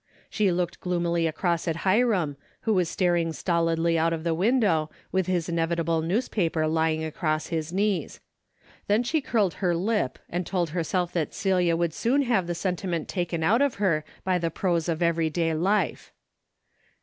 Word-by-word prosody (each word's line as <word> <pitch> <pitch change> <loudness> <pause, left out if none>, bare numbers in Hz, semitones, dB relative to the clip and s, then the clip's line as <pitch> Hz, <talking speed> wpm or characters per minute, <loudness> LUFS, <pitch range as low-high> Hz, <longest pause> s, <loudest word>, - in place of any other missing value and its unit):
She 205 -3 +2
looked 175 0 -2
gloomily 170 -2 0
across 170 +1 -1
at 165 +2 -2
Hiram, 190 - +2 0.3
who 220 - +1
was 180 -4 +1
staring 175 -4 +1
stolidly 165 +1 +1
out 165 +1 +2
of 160 -1 -4
the 165 -1 +1
window, 185 -5 +2 0.2
with 190 -1 0
his 175 -3 0
inevitable 165 -1 0
newspaper 170 -3 0
lying 160 0 +1
across 155 0 -2
his 160 -1 -2
knees. 200 +1 -1 0.7
Then 210 +4 +3
she 310 +6 0
curled 210 -9 +1
her 175 -3 +2
lip 190 - 0
and 175 +1 -2
told 175 -3 -1
herself 175 +1 -1
that 165 -4 -2
Celia 180 -4 +2
would 170 -2 0
soon 270 +9 +1
have 225 -9 +1
the 175 - -2
sentiment 180 -2 -2
taken 175 -3 -2
out 225 +10 +3
of 285 -3 +2
her 175 -7 +1 0.2
by 185 -1 +1
the 165 -1 -1
prose 170 0 -1
of 165 +1 0
everyday 165 0 +1
life. 185 +3 0
170 Hz, 165 wpm, -26 LUFS, 165-190 Hz, 0.7 s, Then